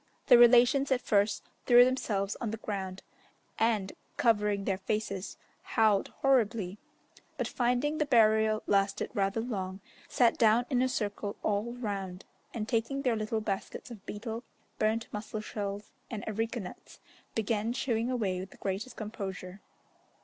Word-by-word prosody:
The 245 - +8
relations 245 +3 +6
at 260 - +3
first 205 -2 +1 0.2
threw 245 0 +8
themselves 210 -6 -1
on 235 - -1
the 220 - -4
ground, 190 -3 -5 0.6
and, 220 -4 +1 0.2
covering 210 -6 +2
their 190 -2 0
faces, 200 -1 -3 0.2
howled 215 -3 +2 0.2
horribly, 225 -7 +2 0.6
but - - -1
finding 250 +5 0
the 300 - +1
burial 220 -3 +4
lasted 200 0 +1
rather 200 0 0
long, 190 -5 -4 0.3
sat 240 -2 +3
down 230 +1 +5
in 250 -1 +3
a 260 - +2
circle 205 -4 -3
all 215 +3 0
round, 200 -6 -5 0.3
and 215 -2 -4
taking 250 +4 -1
their 250 -4 +2
little 220 0 -2
baskets 205 +3 -4
of 215 -4 -10
betel, 225 +2 -5 0.4
burnt 220 +1 +1
mussel 215 +1 -5
shells, 205 -1 -5 0.2
and 215 -3 -5
areca 225 +2 -2
nuts, 180 - -11 0.4
began 220 0 0
chewing 240 -2 -1
away 205 -8 -1
with 190 +1 -6
the - - -16
greatest 200 +5 -4
composure. 195 -3 -6
215 Hz, 145 wpm, -30 LUFS, 200-240 Hz, 0.6 s, The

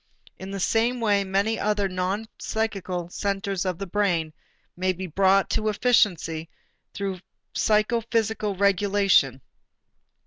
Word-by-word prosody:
In 190 - -7
the 195 0 -5
same 230 +5 +1
way 205 -3 +2
many 195 +3 0
other 205 -1 +1
non 190 +4 -2
psychical 190 -5 -3
centers 195 0 -2
of 180 -2 -1
the 195 - -4
brain 175 -5 0 0.4
may 185 +1 0
be 185 +1 -6
brought 190 +3 +3
to 215 0 +1
efficiency 185 -8 +1 0.4
through 195 -2 -4 0.3
psychophysical 220 -1 +1
regulation. 195 -8 +3
195 Hz, 115 wpm, -25 LUFS, 185-210 Hz, 0.4 s, brought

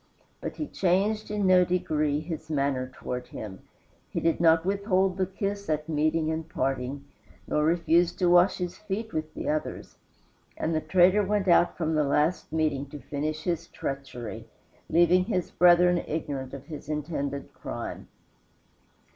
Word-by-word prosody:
But - - -5
he 305 - -3
changed 200 0 0
in 210 -1 -1
no 185 -1 +6
degree 155 -5 0
his 160 -1 -6
manner 140 -3 0
toward 125 0 -5
him; 100 -3 -8 0.5
he - - -2
did 165 - +1
not 165 0 +4
withhold 195 -1 +1
the 190 -1 +1
kiss 200 0 -4
at 155 0 -1
meeting 155 +1 +1
and 160 0 -4
parting, 135 +1 -2 0.4
nor 150 - +1
refuse 170 +1 +3
to 180 - 0
wash 175 +2 +5
his 180 -1 -3
feet 215 +2 -5
with 155 0 -3
the - - -4
others; 155 0 -3 0.6
and 165 - -1
the 155 - +1
traitor 185 +5 +4
went 205 0 0
out 175 0 +4
from 160 -2 -1
the 155 -1 +3
last 150 +5 +1
meeting 155 -3 0
to 150 - -9
finish 155 +4 -4
his 170 -1 -2
treachery, 135 -5 -6 0.4
leaving 175 +2 +4
his 185 -5 -2
brethren 175 0 +5
ignorant 140 -4 -4
of 135 0 -10
his 150 -2 -9
intended 150 -2 -3
crime. - - -6
160 Hz, 155 wpm, -27 LUFS, 150-180 Hz, 0.6 s, no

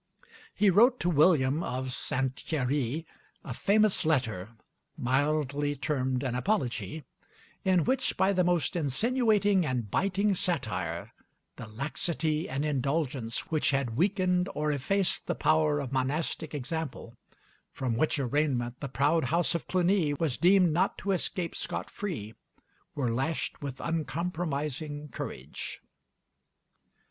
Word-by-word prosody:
He 205 -1 +4
wrote 240 +7 +5
to 175 - +1
William 150 -2 +4
of 130 -4 -3
St. 130 +1 -1
Thierry 145 +1 -1 0.4
a 125 - -5
famous 210 - +3
letter, 120 - 0 0.5
mildly 145 +2 0
termed 130 -3 -1
an 130 -3 -1
Apology; 125 - -1 0.6
in 185 -4 +3
which, 260 +1 0
by 190 +2 +3
the 180 -1 +3
most 175 -4 +1
insinuating 205 - +2
and 125 -8 -2
biting 200 +1 +1
satire, 110 - -2 0.4
the 120 - -8
laxity 155 +6 -1
and 135 +3 -1
indulgence 135 -4 -1
which 155 -2 +2
had 135 -5 0
weakened 180 - +2
or 150 0 0
effaced 185 +7 0
the - - 0
power 155 -1 +2
of 135 -3 -4
monastic 145 +3 -1
example 145 -3 -4 0.6
(from 125 -3 -2
which 155 +6 +1
arraignment 130 -3 0
the 140 - -5
proud 145 +5 +2
house 170 +2 +1
of 170 - -3
Cluny 180 -4 +2
was 145 -4 -1
deemed 180 -2 +5
not 175 - +1
to 200 - -2
escape 180 -2 0
scot - - -3
free) 130 - -5 0.6
were 130 -5 0
lashed 135 +7 -2
with 135 -2 -5
uncompromising 150 -2 -3
courage. 70 - -6
150 Hz, 125 wpm, -29 LUFS, 130-175 Hz, 0.6 s, wrote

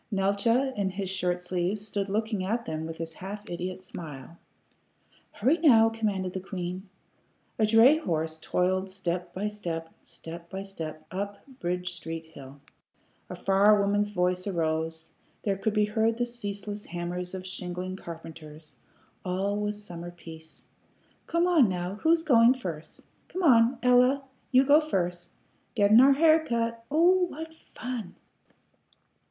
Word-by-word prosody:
Neeltje, 210 +7 +1
in 200 -2 0
his 190 0 -3
shirt 180 -2 0
sleeves, 180 +3 -2
stood 200 -2 -3
looking 215 -1 -1
at 230 +5 -1
them 160 0 -4
with 165 0 -7
his 165 0 -5
half 205 +4 -8
idiot 180 +2 -4
smile. 160 -4 -9 1.0
"Hurry, 265 +11 +2
now!" 225 -8 +6
commanded 200 -5 -2
the 190 - -3
queen. 185 0 -6 0.7
A 215 - +4
dray 230 +7 +7
horse 160 - -2
toiled 185 +3 0
step 180 -2 -3
by 195 +4 -3
step, 170 -6 -5
step 170 +1 -10
by 190 0 -5
step, 160 -6 -7
up 200 +2 -5
Bridge 180 +1 -2
Street 165 -1 -6
hill; 140 -3 -13 0.7
a - - -5
far 200 +2 +4
woman's 205 +1 +1
voice 180 -1 0
arose; 160 -2 -2 0.3
there 200 -2 +1
could 210 +2 -2
be 210 0 +4
heard 220 +2 +1
the 240 - +1
ceaseless 205 -3 -6
hammers 175 +1 -4
of 185 0 -7
shingling 185 0 -5
carpenters; 160 -3 -10 0.5
all 190 +2 -1
was 210 0 -3
summer 175 -3 -7
peace. 160 -2 -12 0.6
"Come 335 +1 +2
on, 325 - +5
now. 180 +2 -3
Who's 325 0 +3
goin' 240 -4 +6
first? 165 -10 -7 0.2
Come 370 - -4
on, 245 -4 +5
Ella; 250 +2 +4 0.3
you 260 0 +6
go 290 +3 +6
first. 180 - -2 0.5
Gettin' 210 +3 +6
our 275 +1 +7
hair 315 +2 +5
cut! 230 -4 -2
Oh 355 +5 +4
what 320 -1 -8 0.2
fun!" 240 -8 -5
195 Hz, 145 wpm, -28 LUFS, 175-230 Hz, 1.0 s, dray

